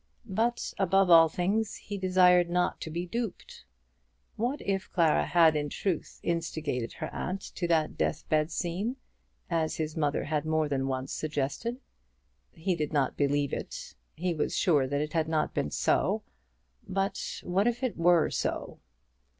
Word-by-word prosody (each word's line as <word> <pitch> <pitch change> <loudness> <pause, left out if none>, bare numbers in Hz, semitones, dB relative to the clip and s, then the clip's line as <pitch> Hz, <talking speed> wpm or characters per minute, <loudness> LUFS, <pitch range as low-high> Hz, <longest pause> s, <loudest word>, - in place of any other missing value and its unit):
But 230 +3 -1
above 195 -1 +3
all 165 -1 +8
things 200 +6 0
he 205 - -7
desired 180 -2 +4
not 180 +1 0
to - - -5
be 170 +3 -3
duped. 230 +3 -5 0.7
What 250 +7 -1
if 195 0 -2
Clara 165 -4 +3
had 165 -3 +5
in 145 -1 -1
truth 180 +2 -3
instigated 160 -7 -2
her - - -6
aunt 190 +2 -3
to 175 - -2
that 160 -2 +1
deathbed 155 0 +1
scene, 185 +8 -2 0.5
as 165 -2 0
his 155 -1 -3
mother 150 -3 0
had 150 -1 -1
more 155 -1 +1
than 135 -2 -1
once 130 0 -3
suggested! 155 - -2 0.7
He 180 +1 -1
did 150 -3 -2
not 140 -4 +1
believe 145 -1 +1
it. - - -5 0.2
He 175 +2 -1
was 155 - -1
sure 150 -8 +3
that 140 +2 -1
it 150 +1 -4
had 160 -2 +1
not 155 -1 0
been - - -1
so. - - +1 0.6
But 195 +1 -2
what 190 +5 +1
if 240 +2 -1
it 255 - 0
were 170 -1 +4
so? - - -3
170 Hz, 160 wpm, -29 LUFS, 155-190 Hz, 0.7 s, all